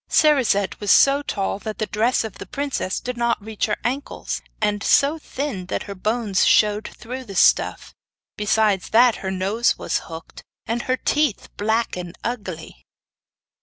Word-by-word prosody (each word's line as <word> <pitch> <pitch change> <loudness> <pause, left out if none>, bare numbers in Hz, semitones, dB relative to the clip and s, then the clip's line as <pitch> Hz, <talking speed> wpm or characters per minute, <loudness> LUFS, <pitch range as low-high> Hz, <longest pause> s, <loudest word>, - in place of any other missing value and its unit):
Cerisette 255 -10 +3
was 205 - -4
so 280 +1 +6
tall 200 -7 -2
that 215 0 -6
the 215 - -1
dress 225 +4 +1
of 220 -4 -8
the - - -8
princess 275 -9 -2
did 250 0 -5
not 235 0 +1
reach 215 +1 -3
her 210 - -1
ankles, 260 +5 -3 0.2
and 210 -1 0
so 290 +8 +3
thin 265 -11 -5
that - - -2
her 200 - -7
bones 210 0 0
showed 210 0 +3
through 255 +3 -8
the 200 -5 -10
stuff. - - +3 0.4
Besides 210 -2 +1
that 235 +1 +5
her 190 - -4
nose 195 +5 +1
was - - -1
hooked, 165 0 -10 0.2
and 235 +1 -2
her 255 +1 -1
teeth 295 -7 0
black 220 +3 0
and 180 -1 -7
ugly. 185 - -6
220 Hz, 165 wpm, -22 LUFS, 200-250 Hz, 0.4 s, so